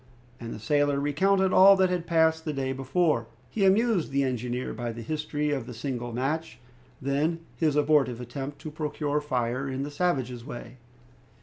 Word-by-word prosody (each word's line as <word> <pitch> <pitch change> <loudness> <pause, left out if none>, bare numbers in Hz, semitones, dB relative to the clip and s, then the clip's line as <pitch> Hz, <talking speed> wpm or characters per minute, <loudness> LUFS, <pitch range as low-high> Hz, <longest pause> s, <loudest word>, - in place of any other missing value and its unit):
And 115 -1 -6
the - - -5
sailor 145 +4 +1
recounted 190 +7 +2
all 195 +1 +8
that 190 -1 +3
had 175 -2 -2
passed 160 -1 +3
the 155 - -3
day 135 -1 -2
before. 135 -2 +1 0.2
He 200 -3 +1
amused 200 -2 +3
the 140 0 +1
engineer 125 -1 -2
by 120 -1 -4
the 115 0 -7
history 150 +2 -2
of 135 -5 -2
the 125 - -7
single 120 0 -4
match, 135 +3 -2 0.4
then 150 +5 0
his 155 -3 +1
abortive 145 -5 +3
attempt 135 +4 -6
to 155 - -6
procure 150 -1 -2
fire 130 -2 -1
in 135 +1 -3
the 145 - -5
savages' 130 -7 -1
way. 120 -1 -9
145 Hz, 175 wpm, -27 LUFS, 125-160 Hz, 0.4 s, all